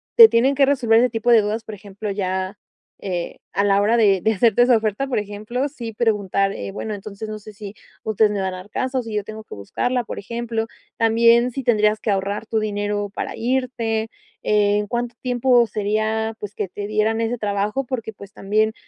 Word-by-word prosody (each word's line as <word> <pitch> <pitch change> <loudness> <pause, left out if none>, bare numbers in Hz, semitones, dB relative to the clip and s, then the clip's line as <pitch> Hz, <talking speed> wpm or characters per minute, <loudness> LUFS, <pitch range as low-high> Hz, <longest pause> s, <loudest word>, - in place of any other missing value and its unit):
te 455 -2 +11
tienen 260 +4 +3
que 275 0 +5
resolver 245 -5 +3
ese 250 +1 +3
tipo 230 +1 0
de 230 -2 +7
dudas, 215 +2 -3
por 215 - -7
ejemplo, 205 +1 -7
ya, 190 0 -2 0.4
eh, 180 -3 -4
a 200 - +1
la 200 0 +4
hora 215 +3 +3
de 200 -5 +4
de 220 - +2
hacerte 225 +3 +3
esa 245 -1 +5
oferta, 215 +4 -1
por 255 - 0
ejemplo. 210 +6 -3
Sí, 240 -6 -7
preguntar, 200 -3 +1
eh, 100 -1 -6
bueno, 215 - -5
entonces 205 +1 -8
no 215 0 -5
sé 215 +1 -11
si 205 0 -9 0.3
ustedes 220 0 +2
me 205 - -2
van 190 -1 -2
a - - -6
dar 185 +3 -11
casa 260 +4 -1
o - - -3
si 225 -1 -7
yo 210 -2 -1
tengo 215 +1 -8
que - - -12
buscarla, 245 - -2
por - - -6
ejemplo, 235 +1 -3 0.3
también 230 +2 +4
si 270 - -4
tendrías 215 -3 +3
que 215 - -3
ahorrar 200 +2 -1
tu 220 - 0
dinero 205 -1 -2
para - - -4
irte, 230 -3 -1 0.4
eh, 205 -1 +3
¿en 210 - -3
cuánto 240 +1 -3
tiempo 245 -1 +3
sería 215 +1 -1
pues 205 0 -7
que 200 -3 -3
te 205 +2 -6
dieran 215 +1 +1
ese 230 +2 -1
trabajo? 210 +4 -1
Porque 235 -3 -4
pues 200 -1 -13
también 215 +3 +1
215 Hz, 215 wpm, -21 LUFS, 205-235 Hz, 0.4 s, te